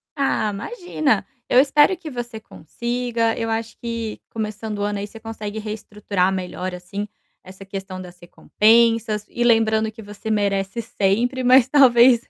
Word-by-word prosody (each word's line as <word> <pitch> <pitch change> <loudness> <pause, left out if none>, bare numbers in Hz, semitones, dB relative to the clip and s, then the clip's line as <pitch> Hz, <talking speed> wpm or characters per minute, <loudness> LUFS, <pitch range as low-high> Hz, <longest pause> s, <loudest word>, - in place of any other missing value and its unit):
Ah, 275 -6 +1
imagina! 300 - -1 0.2
Eu 250 - +6
espero 290 +6 +5
que 335 -3 -8
você 240 -4 -6
consiga. 235 +4 -2
Eu 225 -1 -2
acho 225 0 -3
que 230 -2 -4
começando 215 -1 -4
o - - -2
ano 205 0 -1
aí, 205 - -4
você 225 +2 -12
consegue 220 -1 -6
reestruturar 210 -3 -2
melhor 185 0 -4
assim 200 +4 -6 0.4
essa 190 +1 -12
questão 190 -1 -6
das 180 -1 -11
recompensas. 220 +3 +2
E 240 - -2
lembrando 220 -2 +3
que 225 +1 -12
você 205 +2 -8
merece 200 0 0
sempre, 230 +5 0
mas 255 0 +6
talvez, 250 -3 +6
220 Hz, 150 wpm, -22 LUFS, 205-240 Hz, 0.4 s, Eu